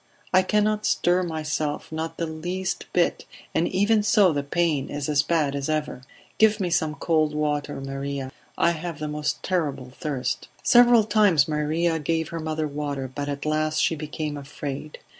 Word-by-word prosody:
I 185 - +7
cannot 210 +2 +1
stir 180 +1 +2
myself, 155 -3 -3
not 160 +1 -4
the 170 - -1
least 175 +4 -4
bit, 175 -1 +1 0.3
and 170 - +2
even 205 +3 +3
so 205 -4 +4
the 145 - 0
pain 150 -1 0
is 145 -1 -3
as 145 -2 +3
bad 150 -3 0
as 140 +1 -3
ever. 155 -4 -2 0.4
Give 220 0 +5
me 180 -3 -1
some 160 -3 +1
cold 155 0 +1
water, 150 -1 -1
Maria; 135 0 -4 0.3
I 170 - +4
have 170 -1 -5
the 155 0 -4
most 150 0 -2
terrible 145 -8 -2
thirst." 140 -2 -3 0.2
Several 240 -2 +6
times 205 -9 +4
Maria 160 +2 0
gave 160 +1 -1
her 165 - -4
mother 155 -1 -2
water, 140 -3 -4
but 145 +1 -3
at 140 0 -4
last 155 0 0
she 165 - +2
became 150 0 -4
afraid. 145 +1 -6
155 Hz, 170 wpm, -25 LUFS, 145-175 Hz, 0.4 s, I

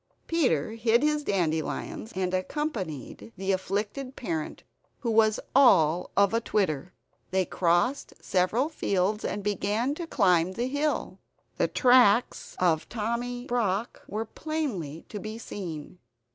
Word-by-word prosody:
Peter 255 - +1
hid 230 +2 +2
his 300 0 +1
dandelions, 170 - -2
and 185 -1 -1
accompanied 185 - -4
the 195 +1 -1
afflicted 205 +8 -2
parent, 160 -9 -4 0.4
who 235 - -1
was 220 -1 +4 0.2
all 180 - +5
of 200 +1 +4
atwitter. 190 -9 0 0.4
They 190 0 +1
crossed 175 +12 +1
several 195 +9 +1
fields 205 - 0
and 205 - -3
began 210 +5 0
to 330 +2 -6
climb 185 - +3
the 235 +5 -2
hill; 285 +3 -1 0.4
the - - +2
tracks 245 -3 +4
of 165 -4 +1
Tommy 240 +2 -3
Brock 230 -3 -1
were 215 +2 -3
plainly 220 - -4
to 210 - -5
be 215 +2 -6
seen. 175 -7 -7
210 Hz, 125 wpm, -27 LUFS, 185-245 Hz, 0.4 s, all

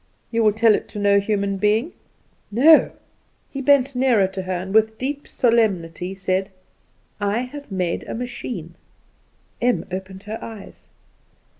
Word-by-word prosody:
"You 230 -1 +1
will 215 - +5
tell 220 +1 +4
it - - -2
to 210 - -7
no 200 0 +4
human 200 -1 -1
being?" 215 - +1 0.6
"No." 290 +9 +6 0.6
He 275 - -4
bent 275 -1 +3
nearer 250 -6 +3
to 190 0 -5
her, 185 0 -5
and 185 +2 -4
with 220 0 +3
deep 280 +4 -4
solemnity 190 -7 0
said: 190 0 -1 0.7
"I 205 +3 0
have 280 0 -8
made 180 -3 -2
a - - -4
machine!" 240 -8 -6 0.9
Em 245 0 +1
opened 190 +1 -6
her 220 +2 -6
eyes. 220 -3 -11
215 Hz, 145 wpm, -22 LUFS, 190-245 Hz, 0.9 s, No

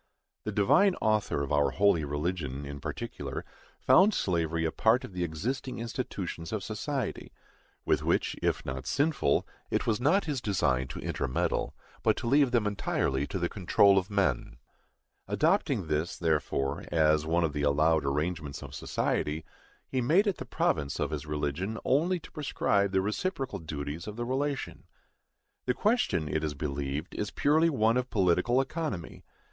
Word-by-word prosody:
The - - -1
Divine 180 - +4
Author 105 -9 +1
of 70 - -4
our 75 -1 +3
holy 100 -5 +3
religion, 75 -1 -3
in 70 0 -6
particular, - - -5 0.3
found 200 +3 +5
slavery 85 -2 0
a 80 - 0
part 115 +4 +3
of 115 - -9
the 90 -1 -2
existing 115 - -3
institutions 105 -8 -4
of 110 -3 -2
society; 125 - -3 0.5
with - - +2
which, - - +1
if - - 0
not 65 0 -5
sinful, 140 - +1 0.2
it - - 0
was 115 +1 0
not 165 +10 +3
his 145 -6 -2
design 65 - +1
to - - -7
intermeddle, 65 - -1 0.3
but - - +2
to - - -5
leave 140 +2 +4
them 120 -3 +2
entirely 70 -9 0
to - - -3
the 85 -1 0
control 100 +1 +4
of 95 - -7
men. 95 -12 0 0.7
Adopting - - +1
this, 75 +2 -1
therefore, 75 -3 0
as 75 -1 +3
one 85 +2 +2
of 80 -3 0
the 75 - -2
allowed 75 +2 +3
arrangements 75 +1 -2
of - - -9
society, 75 +2 -1 0.4
he 130 - -1
made 165 - +4
it 200 -3 0
the - - -6
province 70 -2 0
of - - -1
his 75 -1 -4
religion 75 +8 -2
only 170 +7 +2
to - - -14
prescribe 100 -9 0
the 95 -1 +2
reciprocal 125 - -2
duties 75 +1 -5
of 105 - -6
the 120 +1 -3
relation. 135 +2 -2 0.8
The 125 - +2
question, 205 - +1
it 80 +1 -1
is 75 -1 -2
believed, 70 0 -3
is 105 - -2
purely 155 +7 +3
one 115 -5 +2
of 125 0 -1
political 95 +5 +2
economy. 135 - -3
95 Hz, 165 wpm, -29 LUFS, 75-125 Hz, 0.8 s, found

